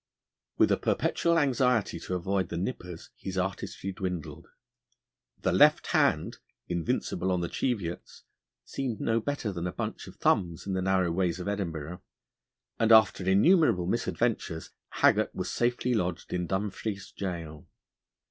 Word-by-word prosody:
With -, -, +4 dB
a -, -, +4 dB
perpetual 170 Hz, 0 st, +1 dB
anxiety 125 Hz, -6 st, +2 dB
to 90 Hz, -, -4 dB
avoid 95 Hz, 0 st, -1 dB
the 85 Hz, -, -4 dB
nippers 90 Hz, -3 st, -5 dB
his 95 Hz, -1 st, -6 dB
artistry 95 Hz, +1 st, -3 dB
dwindled. 90 Hz, -4 st, -5 dB, 1.0 s
The -, -, +2 dB
left -, -, +5 dB
hand, -, -, +2 dB, 0.3 s
invincible 85 Hz, +2 st, -1 dB
on 90 Hz, -1 st, +1 dB
the 85 Hz, -, -1 dB
Cheviots, 100 Hz, -9 st, -3 dB, 0.4 s
seemed 125 Hz, -, -3 dB
no 115 Hz, 0 st, +1 dB
better 130 Hz, -3 st, -2 dB
than 90 Hz, -1 st, -3 dB
a -, -, -3 dB
bunch -, -, -5 dB
of -, -, -11 dB
thumbs 85 Hz, -3 st, +1 dB
in 95 Hz, -, -2 dB
the 95 Hz, -, 0 dB
narrow 95 Hz, -2 st, +2 dB
ways 90 Hz, 0 st, 0 dB
of 90 Hz, -, -5 dB
Edinburgh; 90 Hz, -5 st, -4 dB, 0.8 s
and 115 Hz, 0 st, +3 dB
after 110 Hz, -4 st, +6 dB
innumerable 105 Hz, -, +4 dB
misadventures 115 Hz, -4 st, -1 dB, 0.2 s
Haggart -, -, +2 dB
was -, -, -3 dB
safely 125 Hz, +1 st, 0 dB
lodged 90 Hz, -5 st, -2 dB
in 90 Hz, -1 st, -1 dB
Dumfries 100 Hz, +1 st, -3 dB
gaol. 85 Hz, -6 st, -5 dB
95 Hz, 140 wpm, -29 LUFS, 90-115 Hz, 1.0 s, after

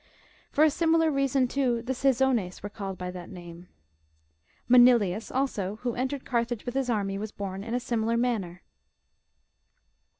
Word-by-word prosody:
For 300 Hz, -, +3 dB
a 310 Hz, -, +5 dB
similar 325 Hz, 0 st, +2 dB
reason, 275 Hz, -2 st, +1 dB
too, 245 Hz, -3 st, 0 dB
the 260 Hz, +2 st, -2 dB
Caesones 255 Hz, -8 st, +1 dB
were 205 Hz, -, -5 dB
called 195 Hz, -2 st, -6 dB
by 180 Hz, 0 st, -5 dB
that 180 Hz, -1 st, -9 dB
name.^^ 175 Hz, -1 st, -11 dB, 1.0 s
Manilius, 240 Hz, -5 st, +5 dB
also, 210 Hz, -7 st, -1 dB
who 245 Hz, -2 st, -1 dB
en 255 Hz, +3 st, -1 dB
tered 280 Hz, -1 st, -6 dB
Carthage 235 Hz, -2 st, -1 dB
with 245 Hz, -, -4 dB
his 265 Hz, -1 st, -1 dB
army, 200 Hz, -3 st, -1 dB
was 215 Hz, 0 st, -5 dB
born 195 Hz, -1 st, -5 dB
in 230 Hz, +2 st, -3 dB
a -, -, +1 dB
similar 230 Hz, -1 st, -1 dB
manner. 205 Hz, -8 st, -2 dB
235 Hz, 160 wpm, -27 LUFS, 195-260 Hz, 1.0 s, a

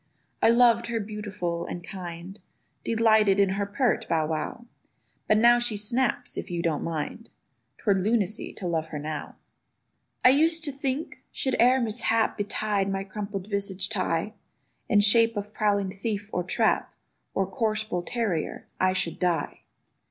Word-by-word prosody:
I -, -, +5 dB
loved 235 Hz, -1 st, +4 dB
her 235 Hz, -1 st, -1 dB
beautiful 205 Hz, -5 st, -4 dB
and 175 Hz, -, -6 dB
kind; 180 Hz, +1 st, -8 dB, 0.4 s
Delighted 220 Hz, -3 st, +3 dB
in 200 Hz, -1 st, +4 dB
her 200 Hz, +1 st, -1 dB
pert 245 Hz, +4 st, 0 dB
Bow 160 Hz, -2 st, +2 dB
wow: 160 Hz, +9 st, -4 dB, 0.6 s
But 215 Hz, -, +4 dB
now 240 Hz, +2 st, +6 dB
she 240 Hz, -3 st, 0 dB
snaps 245 Hz, +4 st, -1 dB
if -, -, -7 dB
you 170 Hz, -1 st, -3 dB
don't 160 Hz, -4 st, 0 dB
mind; 165 Hz, +8 st, -4 dB, 0.5 s
'Twere 200 Hz, -3 st, +1 dB
lunacy 215 Hz, 0 st, 0 dB
to 195 Hz, -, -8 dB
love 160 Hz, -2 st, -1 dB
her 155 Hz, -, -6 dB
now. 150 Hz, 0 st, -5 dB, 0.9 s
I -, -, +10 dB
used 320 Hz, +5 st, +4 dB
to 295 Hz, -, +1 dB
think, 275 Hz, +2 st, -3 dB
should 265 Hz, -, -1 dB
e'er 250 Hz, +2 st, +5 dB
mishap 225 Hz, -1 st, +1 dB
Betide 205 Hz, -1 st, -1 dB
my 195 Hz, 0 st, -2 dB
crumple 200 Hz, 0 st, -5 dB
visaged 200 Hz, 0 st, -1 dB
Ti, 185 Hz, +1 st, -1 dB, 0.6 s
In 205 Hz, -2 st, +5 dB
shape 230 Hz, +2 st, +5 dB
of 205 Hz, +1 st, -5 dB
prowling 200 Hz, -3 st, +1 dB
thief, 205 Hz, +1 st, -4 dB
or 180 Hz, -, 0 dB
trap, 180 Hz, -, +1 dB, 0.4 s
Or 195 Hz, -, +1 dB
coarse 215 Hz, +2 st, -1 dB
bull 180 Hz, -5 st, -3 dB
terrier—I 185 Hz, -2 st, -2 dB
should 175 Hz, -3 st, -1 dB
die. 175 Hz, -2 st, -1 dB
205 Hz, 150 wpm, -26 LUFS, 185-230 Hz, 0.9 s, I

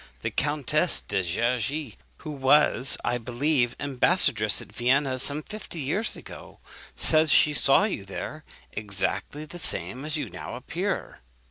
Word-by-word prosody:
The -, -, -3 dB
Countess 150 Hz, +3 st, +1 dB
de 100 Hz, -2 st, -2 dB
Gergy, 120 Hz, -, -2 dB, 0.2 s
who 155 Hz, -, -8 dB
was, 140 Hz, -1 st, +3 dB
I 120 Hz, -, 0 dB
believe, 125 Hz, +1 st, 0 dB
ambassadress 130 Hz, -, +2 dB
at -, -, -11 dB
Vienna 130 Hz, +2 st, 0 dB
some 145 Hz, +3 st, +2 dB
fifty 210 Hz, -4 st, -7 dB
years 160 Hz, +11 st, -2 dB
ago, -, -, -12 dB, 0.4 s
says 155 Hz, -1 st, +6 dB
she 150 Hz, -, +4 dB
saw 140 Hz, +5 st, +4 dB
you 210 Hz, -, -2 dB
there, 100 Hz, +11 st, -7 dB, 0.3 s
exactly 105 Hz, +7 st, -4 dB
the 175 Hz, +3 st, -11 dB
same 135 Hz, -4 st, +1 dB
as 155 Hz, +1 st, -4 dB
you -, -, -4 dB
now -, -, -8 dB
appear.' 175 Hz, +10 st, -4 dB
140 Hz, 140 wpm, -25 LUFS, 120-155 Hz, 0.4 s, says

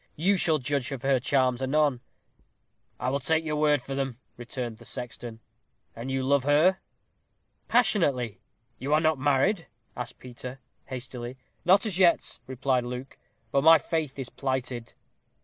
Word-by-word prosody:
You 190 Hz, +6 st, +3 dB
shall 165 Hz, -4 st, +3 dB
judge 140 Hz, -1 st, -2 dB
of 135 Hz, -2 st, -5 dB
her 135 Hz, -1 st, +3 dB
charms 130 Hz, -1 st, +1 dB
anon." 135 Hz, -1 st, +2 dB, 1.0 s
"I 125 Hz, +1 st, -1 dB
will 140 Hz, -, 0 dB
take 160 Hz, +4 st, +1 dB
your 150 Hz, -1 st, -1 dB
word 150 Hz, -3 st, +3 dB
for 135 Hz, -, -5 dB
them," 135 Hz, -3 st, -2 dB, 0.2 s
returned 120 Hz, -1 st, -5 dB
the -, -, -13 dB
sexton; 115 Hz, 0 st, -7 dB, 0.5 s
"and 115 Hz, +3 st, -6 dB
you 135 Hz, 0 st, -1 dB
love 140 Hz, 0 st, +3 dB
her?" 155 Hz, +7 st, +4 dB, 0.9 s
"Passionately." 165 Hz, -, +2 dB, 0.4 s
"You 140 Hz, +4 st, +1 dB
are -, -, +4 dB
not 155 Hz, -3 st, +2 dB
married?" 145 Hz, +7 st, +2 dB, 0.3 s
asked 125 Hz, 0 st, -5 dB
Peter, 125 Hz, +1 st, -9 dB, 0.3 s
hastily. 125 Hz, -1 st, -7 dB, 0.3 s
"Not 190 Hz, +4 st, +5 dB
as 195 Hz, -4 st, 0 dB
yet," 175 Hz, -3 st, +3 dB
replied 130 Hz, -1 st, 0 dB
Luke; 125 Hz, +2 st, -6 dB, 0.4 s
"but 140 Hz, -, +2 dB
my 165 Hz, +1 st, +9 dB
faith 155 Hz, -2 st, -2 dB
is 135 Hz, -2 st, -5 dB
plighted." 130 Hz, -3 st, -3 dB
135 Hz, 150 wpm, -27 LUFS, 125-155 Hz, 1.0 s, my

